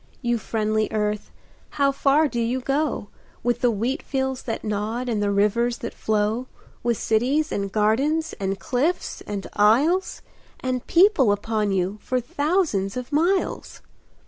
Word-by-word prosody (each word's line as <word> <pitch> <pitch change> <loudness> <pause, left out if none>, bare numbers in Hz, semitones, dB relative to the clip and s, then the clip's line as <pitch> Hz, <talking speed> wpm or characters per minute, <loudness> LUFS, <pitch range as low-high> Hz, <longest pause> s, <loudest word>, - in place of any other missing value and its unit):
You 240 -1 +1
friendly 215 -1 0
Earth, 210 -1 -1 0.5
how 280 -1 +4
far 280 +3 +3
do 240 -4 -2
you 240 +3 0
go, 275 -4 -1 0.3
With 240 0 0
the 245 - +4
wheat 235 +7 -1
fields 265 -1 -2
that 225 - -4
nod 215 +4 -2
and 220 -4 0
the 205 - +1
rivers 210 +4 +2
that 235 - -6
flow, 215 +3 0 0.3
With 235 -2 0
cities 270 +8 +1
and 200 -1 -2
gardens, 270 +11 +1
and 195 0 -2
cliffs 290 +8 -1
and 200 -1 -4
isles, 275 - +3 0.4
And 255 -1 -3
people 340 - +5
upon 210 0 0
you 190 +2 -1
for 255 - -1
thousands 270 - 0
of 250 -1 -6
miles? 345 +6 0
240 Hz, 145 wpm, -24 LUFS, 210-275 Hz, 0.5 s, people